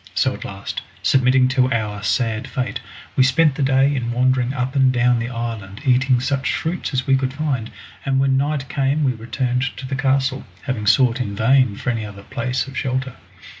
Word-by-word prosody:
So -, -, +2 dB
at -, -, -8 dB
last, 100 Hz, 0 st, -6 dB, 0.2 s
submitting 130 Hz, 0 st, +4 dB
to 130 Hz, -1 st, +2 dB
our 105 Hz, -2 st, -2 dB
sad 110 Hz, +1 st, 0 dB
fate, 130 Hz, -2 st, -3 dB, 0.4 s
we -, -, +3 dB
spent 135 Hz, +4 st, +4 dB
the 140 Hz, -, -4 dB
day 135 Hz, +1 st, +3 dB
in 120 Hz, -2 st, -2 dB
wandering 125 Hz, 0 st, +1 dB
up 130 Hz, 0 st, -3 dB
and 135 Hz, -1 st, +4 dB
down 125 Hz, -1 st, +2 dB
the 120 Hz, +1 st, -3 dB
island 115 Hz, -4 st, -5 dB
eating 130 Hz, -1 st, +3 dB
such 130 Hz, +1 st, -1 dB
fruits 170 Hz, +3 st, -3 dB
as 130 Hz, -2 st, -1 dB
we 135 Hz, -, +4 dB
could 130 Hz, -1 st, 0 dB
find, 140 Hz, -7 st, -2 dB, 0.3 s
and 135 Hz, -1 st, +1 dB
when 135 Hz, 0 st, +3 dB
night 140 Hz, 0 st, 0 dB
came 140 Hz, +3 st, 0 dB
we 135 Hz, -, +3 dB
returned 125 Hz, +2 st, -2 dB, 0.2 s
to 135 Hz, -, -7 dB
the 135 Hz, +1 st, -3 dB
castle, 135 Hz, 0 st, +1 dB, 0.2 s
having 115 Hz, -6 st, -3 dB
sought 120 Hz, +3 st, +4 dB
in 100 Hz, -5 st, -3 dB
vain 125 Hz, 0 st, +3 dB
for 125 Hz, -, -2 dB
any 115 Hz, -2 st, -3 dB
other 100 Hz, -1 st, -9 dB
place 125 Hz, +4 st, -2 dB
of 135 Hz, -1 st, -11 dB
shelter. 130 Hz, 0 st, -2 dB
130 Hz, 200 wpm, -21 LUFS, 120-135 Hz, 0.4 s, submitting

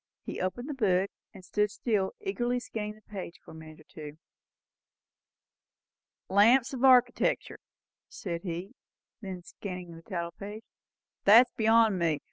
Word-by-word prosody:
He -, -, -5 dB
opened 185 Hz, +8 st, -3 dB
the 300 Hz, -, -3 dB
book, 195 Hz, -6 st, +1 dB, 0.2 s
and 190 Hz, -3 st, -14 dB
stood 210 Hz, +2 st, +1 dB
still, 205 Hz, -3 st, -1 dB
eagerly 250 Hz, -12 st, -1 dB
scanning 210 Hz, -3 st, -5 dB
the 215 Hz, -, -21 dB
page, 190 Hz, -5 st, -8 dB
for -, -, -12 dB
a -, -, -11 dB
minute 155 Hz, 0 st, -12 dB
or -, -, -17 dB
two. 150 Hz, -1 st, -10 dB, 2.1 s
"'Lamps 230 Hz, +7 st, +4 dB
of 260 Hz, -, -4 dB
Architectur'," 255 Hz, -1 st, +3 dB, 0.5 s
said 170 Hz, -3 st, -5 dB
he, 180 Hz, +4 st, -5 dB, 0.5 s
looking 185 Hz, -3 st, -7 dB, 0.2 s
then 180 Hz, -3 st, -6 dB
at -, -, -19 dB
the -, -, -22 dB
title 170 Hz, -3 st, -3 dB
page; 205 Hz, +5 st, -9 dB, 0.6 s
"that's 235 Hz, +5 st, +8 dB
beyond 225 Hz, -3 st, +3 dB
me. 165 Hz, -3 st, +1 dB
200 Hz, 145 wpm, -29 LUFS, 180-230 Hz, 2.1 s, that's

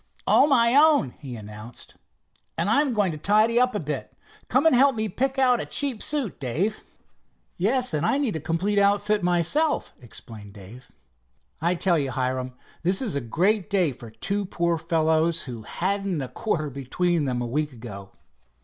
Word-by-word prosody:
"All 285 Hz, -, +5 dB
my 235 Hz, -3 st, +5 dB
own," 295 Hz, -, +5 dB
he 135 Hz, -5 st, -8 dB
announced, 105 Hz, +2 st, -10 dB, 0.6 s
"and 170 Hz, +5 st, 0 dB
I'm 285 Hz, +3 st, +3 dB
going 205 Hz, -6 st, +1 dB
to 155 Hz, -, -7 dB
tidy 215 Hz, +6 st, +3 dB
up 250 Hz, -2 st, +2 dB
a -, -, 0 dB
bit. 150 Hz, -1 st, -5 dB, 0.4 s
Come -, -, +2 dB
and 320 Hz, -, +5 dB
help 270 Hz, +1 st, +4 dB
me 220 Hz, 0 st, -1 dB
pick 265 Hz, +7 st, -2 dB
out 250 Hz, -2 st, +3 dB
a -, -, -4 dB
cheap 270 Hz, -6 st, 0 dB
suit, 285 Hz, -, -2 dB
Dave." 165 Hz, -, -2 dB, 0.7 s
"Yes, 250 Hz, +5 st, +1 dB
and 155 Hz, 0 st, 0 dB
I 175 Hz, -, +2 dB
need 270 Hz, -, 0 dB
a -, -, -2 dB
complete 175 Hz, +7 st, 0 dB
outfit 205 Hz, +1 st, +2 dB
myself," 180 Hz, -, +1 dB
explained 110 Hz, -3 st, -11 dB
Dave. 105 Hz, +5 st, -13 dB, 0.7 s
"I 170 Hz, +2 st, +1 dB
tell 175 Hz, -1 st, +2 dB
you, 140 Hz, -2 st, -2 dB
Hiram, 130 Hz, 0 st, -2 dB, 0.3 s
this 185 Hz, +3 st, +2 dB
is 240 Hz, -8 st, -2 dB
a 140 Hz, -, -1 dB
great 185 Hz, -, 0 dB
day 185 Hz, -7 st, +2 dB
for 120 Hz, -2 st, -11 dB
two 200 Hz, -, -3 dB
poor 170 Hz, -3 st, -1 dB
fellows 160 Hz, 0 st, +1 dB
who 120 Hz, -4 st, -7 dB
hadn't 190 Hz, -, -2 dB
a 130 Hz, -, -6 dB
quarter 155 Hz, -10 st, -2 dB
between 150 Hz, +5 st, -1 dB
them 125 Hz, -2 st, -2 dB
a 120 Hz, -, -2 dB
week 150 Hz, +5 st, -2 dB
ago." 105 Hz, -6 st, -10 dB
175 Hz, 175 wpm, -24 LUFS, 135-215 Hz, 0.7 s, All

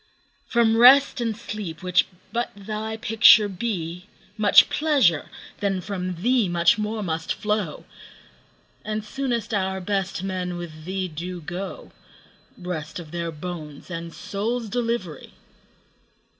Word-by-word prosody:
From 230 Hz, -2 st, +3 dB
Rest 265 Hz, +2 st, +7 dB
and 225 Hz, -3 st, -1 dB
Sleep, 205 Hz, -7 st, -6 dB
which 180 Hz, 0 st, +3 dB, 0.3 s
but 240 Hz, +1 st, -1 dB
thy 215 Hz, +2 st, -5 dB
picture 220 Hz, -1 st, +6 dB
be, 180 Hz, -3 st, -4 dB, 0.2 s
5 -, -, -28 dB
Much 210 Hz, -1 st, +7 dB
pleasure, 275 Hz, -, +2 dB, 0.3 s
then 195 Hz, -2 st, 0 dB
from 180 Hz, -1 st, -5 dB
thee 240 Hz, -5 st, +3 dB
much 175 Hz, +4 st, +3 dB
more 215 Hz, 0 st, -2 dB
must 160 Hz, -2 st, -2 dB
flow; 210 Hz, -7 st, -2 dB, 1.0 s
And 215 Hz, 0 st, -3 dB
soonest 240 Hz, -1 st, -2 dB
our 190 Hz, -1 st, 0 dB
best 190 Hz, -1 st, -2 dB
men 180 Hz, -2 st, -3 dB
with 155 Hz, -3 st, -8 dB
thee 190 Hz, +1 st, -2 dB
do 175 Hz, +2 st, -6 dB
go— 180 Hz, +4 st, -7 dB, 0.7 s
Rest 175 Hz, -4 st, -5 dB
of 165 Hz, -4 st, -9 dB
their 170 Hz, -1 st, -3 dB
bones 155 Hz, -1 st, -8 dB
and 165 Hz, 0 st, -5 dB
souls' 220 Hz, +6 st, -3 dB
delivery! 230 Hz, -8 st, -3 dB
195 Hz, 130 wpm, -24 LUFS, 175-220 Hz, 1.0 s, Rest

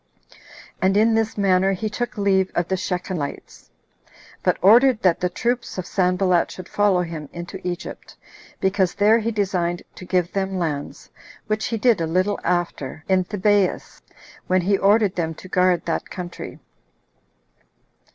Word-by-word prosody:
And 190 Hz, +1 st, +3 dB
in 225 Hz, +2 st, +4 dB
this 225 Hz, -1 st, 0 dB
manner 195 Hz, -1 st, +3 dB
he 205 Hz, +3 st, -3 dB
took 240 Hz, +3 st, -4 dB
leave 190 Hz, -2 st, +2 dB
of 175 Hz, -1 st, 0 dB
the 190 Hz, -, +1 dB
Shechemites; 180 Hz, -5 st, -5 dB, 0.7 s
but -, -, +1 dB
ordered 235 Hz, +5 st, +5 dB
that 180 Hz, -3 st, +3 dB
the 180 Hz, -, 0 dB
troops 235 Hz, +6 st, -2 dB
of 185 Hz, -, -3 dB
Sanballat 180 Hz, -2 st, +1 dB
should 185 Hz, -, -9 dB
follow 205 Hz, -3 st, +2 dB
him 160 Hz, -4 st, -7 dB
into 175 Hz, +2 st, -8 dB
Egypt, 180 Hz, 0 st, -6 dB, 0.4 s
because 190 Hz, -1 st, +1 dB
there 210 Hz, +3 st, +4 dB
he 225 Hz, +1 st, -1 dB
designed 185 Hz, -5 st, -1 dB
to -, -, -11 dB
give 180 Hz, -1 st, 0 dB
them 195 Hz, -1 st, -1 dB
lands, 150 Hz, -5 st, -4 dB, 0.3 s
which 215 Hz, 0 st, -1 dB
he 225 Hz, -, -2 dB
did 225 Hz, -4 st, +3 dB
a 165 Hz, -, 0 dB
little 185 Hz, +5 st, 0 dB
after 170 Hz, -4 st, -2 dB
in 185 Hz, -1 st, +2 dB
Thebais, 205 Hz, -1 st, 0 dB, 0.5 s
when 185 Hz, 0 st, +2 dB
he 195 Hz, +3 st, +2 dB
ordered 200 Hz, 0 st, +3 dB
them 165 Hz, -2 st, -2 dB
to 185 Hz, -, -12 dB
guard 180 Hz, -1 st, +2 dB
that 165 Hz, -, -2 dB
country. 175 Hz, -1 st, -7 dB
185 Hz, 150 wpm, -22 LUFS, 175-205 Hz, 0.7 s, ordered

